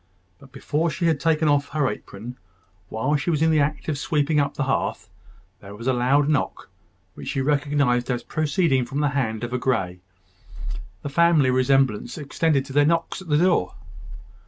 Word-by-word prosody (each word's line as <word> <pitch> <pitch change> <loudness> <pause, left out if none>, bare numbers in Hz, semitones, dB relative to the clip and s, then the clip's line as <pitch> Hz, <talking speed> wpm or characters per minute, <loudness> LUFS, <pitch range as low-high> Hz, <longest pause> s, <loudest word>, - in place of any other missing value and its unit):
But 135 - -17
before 150 +5 -1
she 170 +3 -3
had 160 -4 +2
taken 160 0 +1
off 145 -1 +2
her 145 -2 0
apron, 115 +3 -7 0.5
while 130 +7 0
she 140 - -3
was 160 -2 +1
in 160 - +4
the 155 - +3
act 150 +1 -1
of 150 -3 -2
sweeping 150 -1 +1
up 145 0 0
the 145 - -1
hearth, 130 -5 -2 0.5
there 100 0 -11
was 115 +3 -9
a 130 - +2
loud 135 +4 +2
knock, 150 -2 -1 0.4
which - - -10
she - - -2
recognised 140 -3 +1
as 120 -2 -1
proceeding 155 -3 +1
from 135 +4 -3
the 145 - +2
hand 120 -5 -2
of 120 +1 -4
a 125 - 0
Grey. 95 -9 -1 1.0
The 145 - -3
family 155 -3 +4
resemblance 130 -3 +1
extended 145 -1 0
to 135 - -9
their 145 +1 +4
knocks 165 +4 0
at 190 - -12
the 150 -2 +2
door. 170 - +2
140 Hz, 185 wpm, -23 LUFS, 130-155 Hz, 1.0 s, in